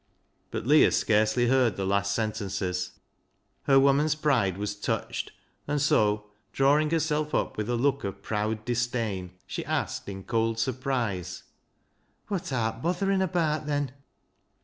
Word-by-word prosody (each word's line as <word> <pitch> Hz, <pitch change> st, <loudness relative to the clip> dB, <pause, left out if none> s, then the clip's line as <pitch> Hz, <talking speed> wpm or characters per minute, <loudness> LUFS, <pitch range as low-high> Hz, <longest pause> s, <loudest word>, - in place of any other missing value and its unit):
But -, -, -4 dB
Leah 150 Hz, +4 st, +6 dB
scarcely 110 Hz, +2 st, +2 dB
heard 125 Hz, -5 st, +3 dB
the 95 Hz, -, -2 dB
last 100 Hz, +1 st, +1 dB
sentences. 95 Hz, -4 st, -2 dB, 0.7 s
Her 135 Hz, -1 st, +6 dB
woman's 140 Hz, +3 st, +3 dB
pride 125 Hz, -, +1 dB
was 100 Hz, 0 st, -2 dB
touched, 105 Hz, -, -3 dB, 0.4 s
and 145 Hz, 0 st, 0 dB
so, 105 Hz, -7 st, +2 dB, 0.3 s
drawing 145 Hz, +3 st, +3 dB
herself 155 Hz, -2 st, 0 dB
up -, -, 0 dB
with 105 Hz, +1 st, -3 dB
a 120 Hz, -, +1 dB
look 135 Hz, +3 st, +1 dB
of 100 Hz, 0 st, -5 dB
proud 110 Hz, 0 st, -2 dB
disdain, 115 Hz, -7 st, -2 dB
she -, -, -4 dB
asked -, -, -2 dB
in 95 Hz, -1 st, -7 dB
cold 115 Hz, +1 st, 0 dB
surprise 120 Hz, -6 st, -2 dB, 0.3 s
— -, -, -44 dB
" -, -, -40 dB
Wot 185 Hz, -6 st, -2 dB
art 115 Hz, -2 st, -1 dB
botherin' 190 Hz, +4 st, +1 dB
abaat, 160 Hz, -5 st, 0 dB
then 145 Hz, -3 st, -1 dB
120 Hz, 145 wpm, -27 LUFS, 105-145 Hz, 0.7 s, Leah